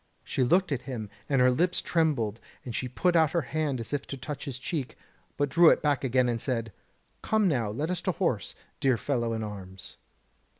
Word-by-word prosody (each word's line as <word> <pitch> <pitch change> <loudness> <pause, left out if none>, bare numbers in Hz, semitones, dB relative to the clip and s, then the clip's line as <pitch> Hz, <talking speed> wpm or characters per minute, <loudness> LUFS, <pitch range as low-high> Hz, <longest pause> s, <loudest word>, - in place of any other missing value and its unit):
She 130 - 0
looked 180 +8 +3
at 130 -3 0
him, 110 -5 -5 0.2
and 135 -2 +3
her 125 0 +6
lips 175 +7 +1
trembled, 135 -10 0 0.3
and 120 - -5
she 125 - -2
put 175 +8 +1
out 160 -2 +4
her 170 -3 +1
hand 145 -2 -1
as 115 +4 -6
if 140 -1 -2
to 135 - -5
touch 145 +3 -6
his 135 -4 -4
cheek, 135 -1 -4 0.4
but 145 - +2
drew 165 +4 +6
it - - +3
back 145 -2 +1
again 130 -1 +2
and 115 -2 -1
said: 115 -4 -2 0.5
"Come 220 -2 +2
now, 120 - +1
let 145 +11 -2
us 180 -1 -2
to - - +1
horse, - - -1 0.2
dear 130 -3 +3
fellow 120 0 -1
in 110 -1 -2
arms." 95 -3 -8
135 Hz, 210 wpm, -28 LUFS, 120-155 Hz, 0.5 s, her